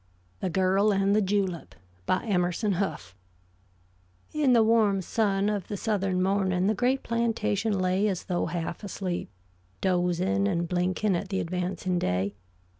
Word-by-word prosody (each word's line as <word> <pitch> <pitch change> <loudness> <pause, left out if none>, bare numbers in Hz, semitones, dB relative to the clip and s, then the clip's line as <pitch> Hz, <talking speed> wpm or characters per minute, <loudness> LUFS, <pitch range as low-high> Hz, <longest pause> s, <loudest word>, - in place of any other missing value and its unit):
THE 185 - -2
GIRL 190 +4 +2
AND 195 +1 +2
THE 215 - +4
JULEP 190 -3 -1 0.3
BY 185 - +1
EMERSON 185 +1 0
HOUGH 175 - -3 1.2
In 290 -4 +3
the 230 -2 +6
warm 220 -3 +3
sun 200 -1 +1
of 205 -3 -2
the 205 - -4
southern 195 -3 0
morning 190 -1 +1
the 210 - +3
great 250 +4 0
plantation 225 - 0
lay 185 +2 +1
as 190 -4 -2
though 175 -2 -1
half 170 +3 -4
asleep, 190 -3 -4 0.5
dozing 185 +2 +1
and 170 -3 0
blinking 180 +3 0
at 185 +2 -3
the 190 -1 -1
advancing 180 +1 -2
day. 95 - -1
190 Hz, 145 wpm, -27 LUFS, 180-205 Hz, 1.2 s, the